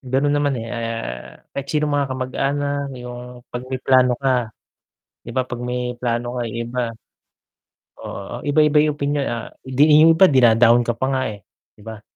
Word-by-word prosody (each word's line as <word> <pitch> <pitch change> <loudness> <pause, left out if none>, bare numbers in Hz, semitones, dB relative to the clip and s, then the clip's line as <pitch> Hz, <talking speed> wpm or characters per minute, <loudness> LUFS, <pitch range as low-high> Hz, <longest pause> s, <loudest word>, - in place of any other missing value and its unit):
Ganun 135 +2 0
naman, 145 -2 +1
eh, 115 0 -5
ah, 115 - -6
kahit 140 0 -5
sinong 150 0 0
mga 140 -1 +1
kamag-anak 140 +2 -2
yung 125 0 -9
'pag 120 0 -4
may 130 -1 -4
plano 130 -1 +4
ka, 125 -4 0 0.7
di 120 - -10
ba 130 - +3
'pag 125 -1 -7
may 125 0 -3 0.2
plano 120 0 -2
ka - - -1
yung 115 +1 -5
iba, 125 +1 -3 1.2
oo, 100 - -7
iba-iba 150 +1 +3
yung 150 - -3
opinyon, 145 -1 -1
ah, 115 -1 -5
di 150 +4 +4
yung 165 0 +6
iba 190 - +8
din 130 -8 +5
down 120 0 +5
ka 120 0 -2
pa - - -1
nga 130 - 0
eh, 100 -2 -10 0.3
di 105 - -17
ba? 110 -1 -8
125 Hz, 185 wpm, -21 LUFS, 120-140 Hz, 1.2 s, iba